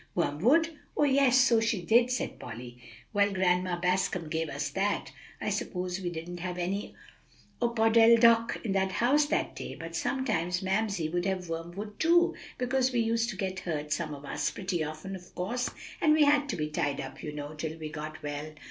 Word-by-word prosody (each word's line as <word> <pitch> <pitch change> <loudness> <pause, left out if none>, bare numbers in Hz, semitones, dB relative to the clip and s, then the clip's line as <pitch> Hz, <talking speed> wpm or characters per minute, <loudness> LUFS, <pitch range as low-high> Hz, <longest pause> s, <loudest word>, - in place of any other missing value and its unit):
"Wormwood? 245 - +2 0.2
Oh, - - +4
yes, 270 -2 +4
so 245 -3 +5
she 225 -5 0
did," 235 +6 +4
said 250 - -2
Polly. 120 +2 -8 0.3
"Well, 200 -1 +3
Grandma 180 -1 +1
Bascom 180 -2 0
gave 160 0 -1
us 145 +1 -3
that; 200 +5 -1 0.3
I - - -2
suppose 180 0 -3
we 180 - -2
didn't 175 +1 -6
have 180 0 -4
any 185 +3 -3 0.7
opodeldoc 230 0 +5
in 210 - 0
the 190 0 +2
house 255 +10 +3
that 295 - -1
day. - - -6
But - - -7
sometimes 185 -10 -1
Mamsie 195 -4 0
would 175 +2 -1
have 185 -3 -2
wormwood 175 +6 -6
too, 345 +1 +4 0.2
because 255 +1 +1
we 245 - +1
used 230 +1 +1
to 215 - -4
get 190 -1 -2
hurt, 150 -5 -2
some 155 -3 -3
of 140 0 -11
us, - - -1
pretty 185 -4 -2
often, 155 +6 -6
of 180 -1 -13
course, 240 +8 -1 0.3
and 305 - +5
we 310 -1 +5
had 290 0 +3
to - - -1
be 150 -2 -2
tied 145 -2 -1
up, 135 - -7
you 150 - -5
know, 145 0 -6
till 155 +1 -5
we 155 -1 -6
got 155 0 -7
well." 145 +1 -5
190 Hz, 190 wpm, -29 LUFS, 165-230 Hz, 0.7 s, so